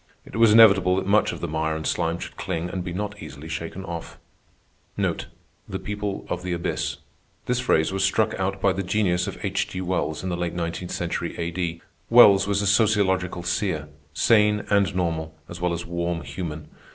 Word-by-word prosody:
It - - -11
was 115 -1 +5
inevitable 100 -5 +7
that 95 0 -1
much 105 +1 +3
of - - -7
the 85 - -2
mire 80 0 -1
and 80 0 -5
slime 85 +1 0
should - - -8
cling 85 +2 -3
and 95 -2 -3
be 90 - -5
not 105 +3 -4
easily 75 -1 -9
shaken 85 +4 -5
off. 85 -2 -7 0.8
The - - -5
people 105 -1 -4
of 90 - -3
the 90 0 -3
abyss—this 120 +7 -4
phrase 95 -8 +2
was 95 0 0
struck 110 +3 +2
out 95 +1 -1
by 95 0 +3
the 95 - -2
genius 90 -2 +1
of - - -5
H. 95 0 0
G. 90 - -6
Wells 90 -4 -2
in 95 - -2
the 90 - -1
late 85 -1 -3
nineteenth 85 +1 -3
century 85 0 -3
A.D. 85 0 -3 0.3
Wells 100 -5 +7
was 100 0 +1
a - - -1
sociological 95 -4 +2
seer, 85 -4 -1 0.2
sane 105 +4 +3
and 100 -1 +3
normal 80 -3 -2
as 85 0 -9
well 90 -1 +1
as 85 0 -3
warm 85 0 -2
human. 80 -4 -6
90 Hz, 190 wpm, -24 LUFS, 85-100 Hz, 0.8 s, inevitable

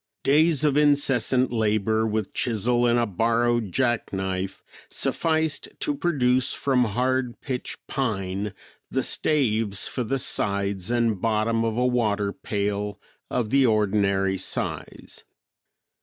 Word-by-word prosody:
Days 155 +1 +3
of 145 -1 +2
incessant 135 -4 +2
labor 110 0 +1
with 110 -1 -2
chisel 120 +1 +1
and 120 0 +3
a 120 - +2
borrowed 115 +1 +1
jackknife 95 -6 -1 0.3
sufficed 160 -1 -1
to 295 - 0
produce 130 - +1
from 130 -3 +1
hard 125 +3 -1
pitch 130 -3 -4
pine 100 -5 -2 0.4
the - - -1
staves 110 -9 0
for 125 - -3
the 135 +4 -1
sides 100 -5 -1
and 115 -5 +1
bottom 115 +1 +1
of 115 0 -1
a 125 - +2
water 105 -5 +1
pail 105 0 -3 0.3
of 115 -3 -1
the 135 -2 +4
ordinary 100 -3 +1
size. - - -5
115 Hz, 120 wpm, -25 LUFS, 105-130 Hz, 0.4 s, the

